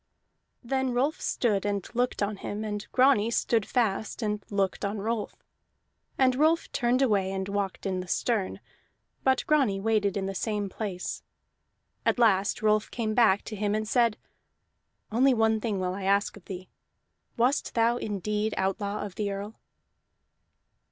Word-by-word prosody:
Then 265 Hz, +1 st, 0 dB
Rolf 275 Hz, +6 st, 0 dB
stood 210 Hz, -5 st, 0 dB
and 200 Hz, -2 st, -2 dB
looked 245 Hz, -3 st, 0 dB
on 205 Hz, 0 st, -2 dB
him, 210 Hz, +2 st, -5 dB
and 210 Hz, -1 st, -4 dB
Grani 255 Hz, -4 st, +4 dB
stood 230 Hz, -2 st, +1 dB
fast 225 Hz, -1 st, 0 dB
and 210 Hz, -1 st, -1 dB
looked 200 Hz, -1 st, -1 dB
on 200 Hz, +1 st, -1 dB
Rolf. 220 Hz, +1 st, -3 dB, 0.7 s
And 260 Hz, -1 st, +4 dB
Rolf 315 Hz, +5 st, +2 dB
turned 245 Hz, +2 st, +2 dB
away 200 Hz, -6 st, +2 dB
and 190 Hz, 0 st, -3 dB
walked 200 Hz, -1 st, -3 dB
in 190 Hz, -1 st, -1 dB
the 180 Hz, -, -6 dB
stern, 210 Hz, +1 st, -1 dB, 0.6 s
but 265 Hz, 0 st, +2 dB
Grani 265 Hz, -11 st, +2 dB
waited 205 Hz, -1 st, +1 dB
in 195 Hz, -, -1 dB
the 195 Hz, -, -3 dB
same 205 Hz, 0 st, -2 dB
place. 190 Hz, -3 st, -4 dB, 0.8 s
At -, -, +2 dB
last 210 Hz, -3 st, +3 dB
Rolf 215 Hz, 0 st, +2 dB
came 220 Hz, -3 st, -2 dB
back 215 Hz, -4 st, +4 dB
to 215 Hz, -, -6 dB
him 205 Hz, 0 st, 0 dB
and 215 Hz, 0 st, -2 dB
said: 235 Hz, -2 st, +2 dB, 0.9 s
"Only 255 Hz, +4 st, +4 dB
one 220 Hz, -1 st, +2 dB
thing 210 Hz, -4 st, -1 dB
will 180 Hz, -1 st, -1 dB
I 195 Hz, 0 st, -5 dB
ask 200 Hz, +1 st, +2 dB
of 205 Hz, -, -15 dB
thee. 185 Hz, -1 st, -8 dB, 0.7 s
Wast 250 Hz, +4 st, +1 dB
thou 230 Hz, +1 st, +3 dB
indeed 210 Hz, 0 st, -2 dB
outlaw 200 Hz, +2 st, -1 dB
of 200 Hz, -, -7 dB
the 205 Hz, +1 st, -2 dB
Earl?" 200 Hz, +2 st, -5 dB
210 Hz, 160 wpm, -28 LUFS, 200-235 Hz, 0.9 s, Grani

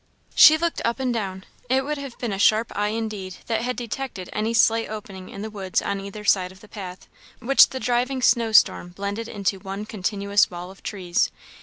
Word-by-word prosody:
She 315 Hz, -, +8 dB
looked 335 Hz, +1 st, -1 dB
up 235 Hz, +3 st, -1 dB
and 255 Hz, -2 st, 0 dB
down. 190 Hz, -4 st, -4 dB, 0.3 s
It 265 Hz, +1 st, +2 dB
would 300 Hz, 0 st, -3 dB
have 275 Hz, -3 st, -8 dB
been 235 Hz, -5 st, -3 dB
a 195 Hz, -, -4 dB
sharp 220 Hz, +1 st, +3 dB
eye 205 Hz, +1 st, 0 dB
indeed 210 Hz, -4 st, -4 dB
that 225 Hz, -1 st, -1 dB
had 250 Hz, +1 st, -2 dB
detected 240 Hz, -5 st, -5 dB
any 215 Hz, +2 st, -1 dB
slight 225 Hz, 0 st, +3 dB
opening 200 Hz, -3 st, -8 dB
in 200 Hz, -, -7 dB
the 220 Hz, -, -6 dB
woods 195 Hz, -3 st, -1 dB
on 200 Hz, -1 st, -3 dB
either 200 Hz, +2 st, -8 dB
side 185 Hz, -3 st, +3 dB
of 185 Hz, -, -16 dB
the 210 Hz, -, -16 dB
path, 185 Hz, -3 st, -9 dB, 0.3 s
which 270 Hz, +3 st, +5 dB
the 260 Hz, -, -5 dB
driving 250 Hz, +1 st, 0 dB
snow 235 Hz, -3 st, +3 dB
storm 205 Hz, -4 st, +4 dB
blended 200 Hz, +5 st, -4 dB
into 200 Hz, -2 st, -2 dB
one 195 Hz, +2 st, -6 dB
continuous 200 Hz, 0 st, +1 dB
wall 180 Hz, +1 st, -8 dB
of 195 Hz, -, -17 dB
trees. 185 Hz, -4 st, -1 dB
210 Hz, 205 wpm, -24 LUFS, 195-235 Hz, 0.3 s, She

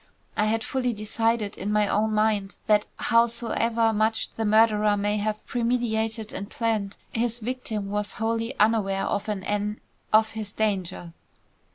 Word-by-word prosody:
I 210 Hz, -, +2 dB
had 225 Hz, +1 st, +1 dB
fully 250 Hz, -2 st, -1 dB
decided 215 Hz, 0 st, -1 dB
in 200 Hz, +3 st, -2 dB
my 210 Hz, -1 st, +3 dB
own 215 Hz, +2 st, +1 dB
mind 210 Hz, -2 st, +1 dB
that 210 Hz, -1 st, +3 dB
howsoever 230 Hz, -3 st, +2 dB
much 220 Hz, +1 st, +1 dB
the 225 Hz, -, -2 dB
murderer 215 Hz, -1 st, +4 dB
may 205 Hz, +1 st, 0 dB
have 215 Hz, +1 st, -2 dB
premeditated 225 Hz, -2 st, -1 dB
and 200 Hz, +1 st, -5 dB
planned, 215 Hz, -4 st, -1 dB
his 235 Hz, 0 st, -1 dB
victim 220 Hz, -4 st, -4 dB
was 205 Hz, 0 st, -2 dB
wholly 230 Hz, +3 st, -2 dB
unaware 210 Hz, -3 st, +2 dB
of 205 Hz, +2 st, -2 dB
an 200 Hz, -3 st, -2 dB
en 210 Hz, +1 st, -2 dB, 0.3 s
of 220 Hz, 0 st, +5 dB
his 215 Hz, -2 st, -6 dB
danger." 185 Hz, -5 st, -2 dB
215 Hz, 150 wpm, -26 LUFS, 210-230 Hz, 0.3 s, of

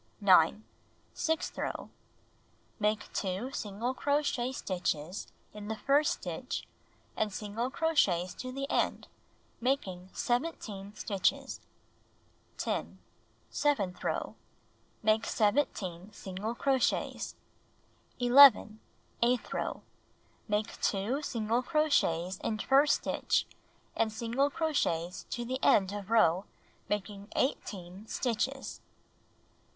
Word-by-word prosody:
9. 195 Hz, 0 st, +5 dB, 0.5 s
Sixth 320 Hz, 0 st, -1 dB
row: -, -, -4 dB, 0.9 s
Make 210 Hz, 0 st, 0 dB
2 195 Hz, +7 st, -2 dB
single 220 Hz, +3 st, -3 dB
crochet 280 Hz, -3 st, 0 dB
stitches 180 Hz, -, -3 dB, 0.3 s
in 210 Hz, 0 st, -8 dB
the 220 Hz, -, -2 dB
first 285 Hz, +6 st, +3 dB
stitch -, -, -5 dB, 0.5 s
and 215 Hz, -1 st, 0 dB
single 210 Hz, +5 st, -3 dB
crochets 205 Hz, -, +2 dB
to 255 Hz, -, -6 dB
the 275 Hz, +1 st, -3 dB
end, -, -, 0 dB, 0.5 s
making 190 Hz, -8 st, -1 dB
17 220 Hz, -7 st, -2 dB
stitches. 200 Hz, -4 st, 0 dB, 1.0 s
10. -, -, -2 dB, 0.5 s
Seventh 200 Hz, -12 st, 0 dB
row: -, -, -2 dB, 0.7 s
Make 220 Hz, 0 st, +3 dB
17 205 Hz, -5 st, 0 dB
single 200 Hz, +4 st, -5 dB
crochets. 265 Hz, 0 st, 0 dB, 0.8 s
11. 245 Hz, -4 st, +7 dB, 0.4 s
Eighth 240 Hz, +1 st, +1 dB
row: -, -, -3 dB, 0.6 s
Make 210 Hz, 0 st, -1 dB
2 220 Hz, +8 st, 0 dB
single 230 Hz, -3 st, 0 dB
crochets 220 Hz, -, +1 dB
in 215 Hz, -, -2 dB
first 275 Hz, +6 st, +4 dB
stitch -, -, +1 dB, 0.5 s
and 225 Hz, -1 st, +1 dB
single 235 Hz, +6 st, 0 dB
crochets 195 Hz, -, -1 dB
to 240 Hz, -, -3 dB
the 260 Hz, +2 st, -2 dB
end 190 Hz, -2 st, +5 dB
of 205 Hz, -1 st, -6 dB
row, 195 Hz, -5 st, +4 dB, 0.4 s
making 205 Hz, -1 st, -3 dB
18 195 Hz, -6 st, -2 dB
stitches. 260 Hz, +4 st, -2 dB
220 Hz, 100 wpm, -31 LUFS, 195-260 Hz, 1.0 s, 11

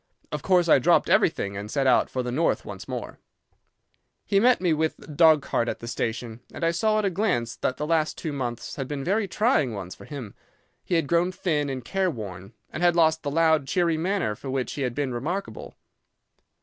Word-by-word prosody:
Of -, -, -3 dB
course 180 Hz, -2 st, +3 dB
I 155 Hz, -, +6 dB
dropped 125 Hz, -, +3 dB
everything 100 Hz, 0 st, +2 dB
and 100 Hz, +1 st, -6 dB
set 135 Hz, +3 st, 0 dB
out 130 Hz, -, +4 dB
for 130 Hz, -, -2 dB
the 125 Hz, -, -3 dB
North 155 Hz, +7 st, 0 dB
once -, -, -8 dB
more. -, -, -6 dB, 1.1 s
"He 195 Hz, -, +3 dB
met 245 Hz, +4 st, +4 dB
me 180 Hz, -3 st, +2 dB
with 160 Hz, +1 st, 0 dB
the -, -, -15 dB
dog 155 Hz, -1 st, +4 dB
cart 120 Hz, -3 st, 0 dB
at -, -, -3 dB
the 115 Hz, -, -9 dB
station, 115 Hz, 0 st, -3 dB
and -, -, -7 dB
I 165 Hz, -, +3 dB
saw 215 Hz, +5 st, +1 dB
at 215 Hz, -, +1 dB
a 195 Hz, -, +1 dB
glance 165 Hz, -, 0 dB
that 130 Hz, -, -1 dB
the 150 Hz, -, -2 dB
last 155 Hz, -1 st, 0 dB
two 155 Hz, -, -4 dB
months 120 Hz, -4 st, -4 dB
had 135 Hz, -2 st, -3 dB
been 145 Hz, -1 st, -4 dB
very 200 Hz, +5 st, 0 dB
trying 185 Hz, -, +1 dB
ones 95 Hz, -2 st, -6 dB
for -, -, -13 dB
him. 130 Hz, -9 st, -8 dB, 0.5 s
He 175 Hz, -, -1 dB
had 165 Hz, -3 st, +2 dB
grown 170 Hz, +3 st, +2 dB
thin 150 Hz, -6 st, -1 dB
and 130 Hz, -3 st, -5 dB
careworn, 110 Hz, -, -3 dB, 0.2 s
and 155 Hz, -, -5 dB
had 175 Hz, -1 st, +4 dB
lost 160 Hz, -1 st, +3 dB
the 145 Hz, -, -3 dB
loud, 160 Hz, -2 st, +2 dB
cheery 170 Hz, +3 st, +1 dB
manner 180 Hz, -, 0 dB
for 135 Hz, +6 st, -8 dB
which 130 Hz, -1 st, -2 dB
he 145 Hz, -, -5 dB
had 125 Hz, -3 st, -2 dB
been 140 Hz, -3 st, -2 dB
remarkable. 170 Hz, +12 st, -4 dB
150 Hz, 215 wpm, -25 LUFS, 125-175 Hz, 1.1 s, I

